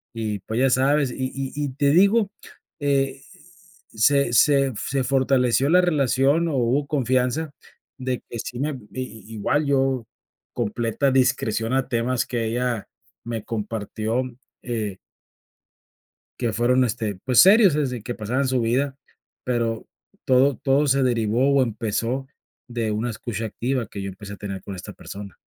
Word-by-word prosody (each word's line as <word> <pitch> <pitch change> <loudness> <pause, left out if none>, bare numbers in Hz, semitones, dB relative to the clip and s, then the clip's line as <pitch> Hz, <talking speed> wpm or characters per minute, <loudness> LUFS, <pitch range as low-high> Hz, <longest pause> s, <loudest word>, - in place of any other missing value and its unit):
Y 110 -2 -2
pues, 110 +2 -1
ya 135 -1 +3
sabes, 135 +1 +2
y - - -8 0.2
y 135 -1 -4
y 145 -1 -2
te 140 0 +3
digo, 200 +5 +4 0.5
eh, 135 -2 0 0.7
se 130 +3 +3
se 135 +2 +4
se 135 -1 -1
fortaleció 130 0 +2
la 180 +2 +6
relación, 145 -1 +2
o, 155 - -1
hubo 130 +3 +1
confianza 130 +2 0 0.5
de 130 -1 -2
que 120 - -6
sí 125 +2 -5
me 145 - 0
a 145 - -5 0.2
i 130 -4 -6
igual, 145 +8 0
yo 135 -3 +1 0.5
completa 120 +3 0
discreción 125 -3 +1
a 135 0 +1
temas 120 0 0
que 120 -2 -2
ella 120 -1 -1 0.4
me 115 -2 -4
compartió, 110 +1 -3 0.4
eh 110 -6 -3 1.4
que 120 -3 -1
fueron, 125 +3 +3
este, 110 -4 -2
pues, 125 -2 +4
serios 195 -1 +7
desde 130 -5 -1
que 120 +3 -5
pasaban 125 +5 -1
su 130 -1 +1
vida, 130 +4 0 0.5
pero 115 -3 -1 0.4
todo 130 +1 +4
todo 140 +4 +2
se 135 0 +3
derivó, 120 +2 +2
o, 135 - +5
empezó 115 +3 -2 0.4
de 120 -3 -2
una 110 +3 -1
escucha 115 0 -4
activa 120 +1 -2
que 100 - -7
yo 95 - -4
empecé 100 +2 -9
a 100 - -9
tener 100 -2 -6
con 100 - -7
esta 90 - -8
persona. 100 -2 -9
125 Hz, 155 wpm, -23 LUFS, 115-135 Hz, 1.4 s, serios